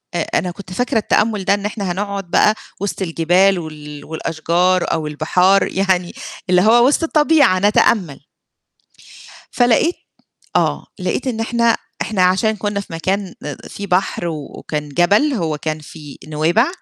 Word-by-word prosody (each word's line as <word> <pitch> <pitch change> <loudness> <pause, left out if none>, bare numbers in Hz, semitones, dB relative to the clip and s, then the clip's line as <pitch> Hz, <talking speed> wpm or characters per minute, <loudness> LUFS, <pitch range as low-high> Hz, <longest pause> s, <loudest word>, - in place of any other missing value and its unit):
أ - - +1 0.2
أنا 180 - -3
كنت 185 0 -10
فاكرة 245 +3 0
التأمُّل 210 -1 +1
ده، - - +4
إن 205 0 -2
إحنا 205 -3 -3
هنقعد 195 -1 -4
بقى 215 - +4 0.3
وِسْط 200 -1 -3
الجبال 180 +2 +2
وال 150 -2 -9
والأشجار 170 +3 0
أو 160 -2 -2
البحار 180 +6 +2
يعني 185 -2 0 0.4
اللي 180 0 +4
هو 235 +5 +5
وِسط 295 +3 +2
الطبيعة 300 - +3
نتأمَّل. 190 -7 +2 1.3
فلقيت 245 +8 +2 0.6
آه، - - +1
لقيت - - -2
إن 235 -3 -2
إحنا 235 0 +1 0.2
إحنا 195 -4 0
عشان 195 +4 +2
كنا 205 0 -2
في 185 - -8
مكان 190 +3 -2
آآ 145 -2 -5
في 200 0 -7
بحر 180 -1 0
وكان 150 -1 -5
جبل، 200 - +3
هو 165 - -2
كان 155 0 -3
في 150 -1 -12
نويبع، 160 - +2
185 Hz, 145 wpm, -18 LUFS, 165-210 Hz, 1.3 s, هو